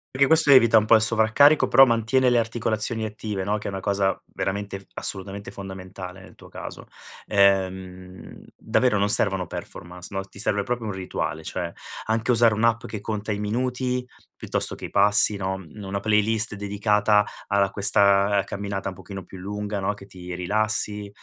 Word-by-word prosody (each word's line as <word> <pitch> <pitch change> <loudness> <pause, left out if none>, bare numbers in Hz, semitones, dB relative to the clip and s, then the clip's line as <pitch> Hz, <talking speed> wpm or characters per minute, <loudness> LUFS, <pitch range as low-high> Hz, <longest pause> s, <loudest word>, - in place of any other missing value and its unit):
Perché 140 +1 +4
questo 160 -2 +5
evita 115 -4 +7
un 110 - +3
po' 115 - +4
il 110 - +6
sovraccarico, 115 +7 +4
però 135 - +7
mantiene 120 +3 +2
le 120 - +3
articolazioni 115 -1 -1
attive, 105 -2 -4
no, 105 +2 0
che 105 - -7
è - - -3
una 95 - -4
cosa 100 0 0 0.2
veramente, 100 0 -4
assolutamente 100 +3 -5
fondamentale 95 -2 -9
nel - - -15
tuo - - -16
caso. - - -9 0.4
Ehm, 95 -2 -1
davvero 125 -5 +1
non 100 +1 +1
servono 95 -4 +2
performance, 90 +1 -9
no, 95 0 -3
ti 100 - -18
serve 100 0 0
proprio 120 +2 -3
un 105 - -3
rituale, 90 -4 -4
cioè 85 -1 -4 0.3
anche 110 +1 -1
usare 115 -2 +4
un'app 115 +2 +1
che 105 -3 -6
conta 105 -1 -4
i 100 - -2
minuti 125 +3 -2 0.4
piuttosto - - -2
che - - -8
i - - -7
passi, 105 +1 +4
no, 95 0 -2
una 95 +2 -7
playlist 110 +1 +1
dedicata 105 +1 +2 0.2
alla 100 -1 +2
questa, 100 0 +3
uhm, 95 - 0
camminata 100 -1 -4
un 95 - -9
pochino 95 -1 -9
più 95 - -12
lunga, 105 +1 -4
no, 95 +2 -1
che 100 - -13
ti 90 -2 -9
rilassi. 105 +2 -1
105 Hz, 175 wpm, -24 LUFS, 95-110 Hz, 0.4 s, evita